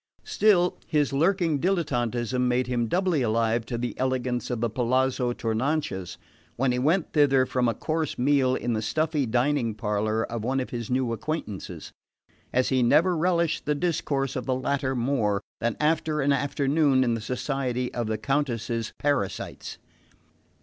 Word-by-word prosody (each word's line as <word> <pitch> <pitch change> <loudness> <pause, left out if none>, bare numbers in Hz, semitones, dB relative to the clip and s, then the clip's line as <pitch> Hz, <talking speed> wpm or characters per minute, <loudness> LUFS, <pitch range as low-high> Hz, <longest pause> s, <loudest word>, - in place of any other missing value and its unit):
Still, 210 - +2
his 150 -3 +1
lurking 165 0 +2
dilettantism 125 - 0
made 125 +1 +1
him 120 -2 -1
doubly 180 - +1
alive 115 0 +1
to 120 - -3
the 120 0 -3
elegance 130 -1 -1
of 120 -2 -2
the 120 - +1
Palazzo 125 +2 +1
Tournanches 115 - -2 0.4
when 130 0 +1
he 125 - 0
went 160 +7 +1
thither 135 -4 +4
from 125 -1 0
a 115 - -2
coarse 160 +3 -2
meal 130 0 +3
in 120 -2 -2
the 110 - -1
stuffy 155 +3 0
dining 120 -1 +1
parlour 110 0 -1
of 115 -1 -4
one 130 +3 0
of 125 - -4
his 120 -2 -4
new 125 -2 0
acquaintances; 105 - -5 0.6
as 125 +1 +2
he 130 -1 +2
never 170 +9 +4
relished 170 -1 +1
the 150 - +2
discourse 145 -4 -1
of 130 - -4
the 130 - +1
latter 135 0 -1
more 115 -5 +1 0.2
than 115 -1 -1
after 155 0 +1
an 140 0 +3
afternoon 140 0 +2
in 120 -2 +1
the 115 - -3
society 125 +1 -2
of 120 -2 -2
the 110 0 -1
Countess's 115 -2 -2
parasites. 135 -10 -2
130 Hz, 160 wpm, -26 LUFS, 120-145 Hz, 0.6 s, thither